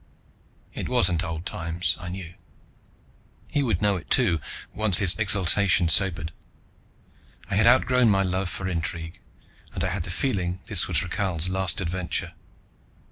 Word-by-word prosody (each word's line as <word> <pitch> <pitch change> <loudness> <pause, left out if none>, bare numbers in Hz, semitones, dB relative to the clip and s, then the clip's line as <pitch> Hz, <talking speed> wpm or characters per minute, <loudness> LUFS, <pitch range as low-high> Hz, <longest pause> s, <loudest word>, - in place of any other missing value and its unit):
It - - -5
wasn't 90 0 +3
old 85 -1 -5
times, 85 -1 0
I 90 - -7
knew. 90 -2 -7 1.1
He 145 - -1
would 110 -8 -1
know 100 -2 +2
it 85 - -11
too, 85 -2 +2 0.3
once 105 -5 +2
his 95 -2 +3
exultation 100 -4 +2
sobered. 85 -3 +2 1.2
I - - -1
had 110 +4 +3
outgrown 125 -1 +4
my 95 -1 +3
love 95 0 -2
for 95 - -5
intrigue, 80 -1 -4 0.6
and 90 - -2
I 95 - 0
had 95 +1 -3
the 85 - -6
feeling 90 -2 -2
this 100 -5 +1
was 85 -3 +1
Rakhal's 90 -2 0
last 95 -1 -1
adventure. 90 0 -3
90 Hz, 145 wpm, -25 LUFS, 85-100 Hz, 1.2 s, outgrown